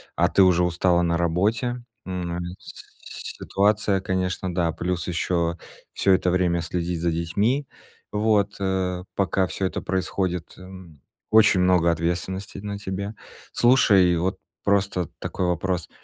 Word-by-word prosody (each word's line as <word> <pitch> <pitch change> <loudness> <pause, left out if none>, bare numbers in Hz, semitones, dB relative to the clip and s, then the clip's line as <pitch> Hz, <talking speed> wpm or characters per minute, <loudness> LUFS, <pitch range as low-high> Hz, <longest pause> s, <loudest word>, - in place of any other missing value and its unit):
а 85 +1 +3
ты 95 - +5
уже 90 -1 +4
устала 90 0 +2
на 85 0 +1
работе, 110 +9 0 0.2
м, 90 -1 -4
нары 85 0 -3
с - - -12 0.5
ситуация, 100 -1 +1
конечно, 95 -1 -2
да, 85 -2 +1
плюс 85 +1 -3
ещё 85 -1 0 0.4
всё 95 - +3
это 90 -1 +2
время 90 -2 +1
следить 85 0 -3
за 85 -1 +1
детьми. 100 - 0 0.5
Вот, 105 -1 +1
э, 95 -2 -1
пока 95 -1 +1
всё 95 - -3
это - - -4
происходит, 95 -2 -2
э, - - -13
м, 90 -6 -12 0.3
очень 110 -4 +6
много 90 -2 +4
ответственности 85 +4 -3
на 100 0 -5
тебе. 100 +1 -4 0.4
Слушай, 100 -8 +5
вот 95 +3 -1 0.3
просто 100 -3 +1
такой 90 - -2
вопрос. 90 0 -1
90 Hz, 140 wpm, -24 LUFS, 85-100 Hz, 0.5 s, очень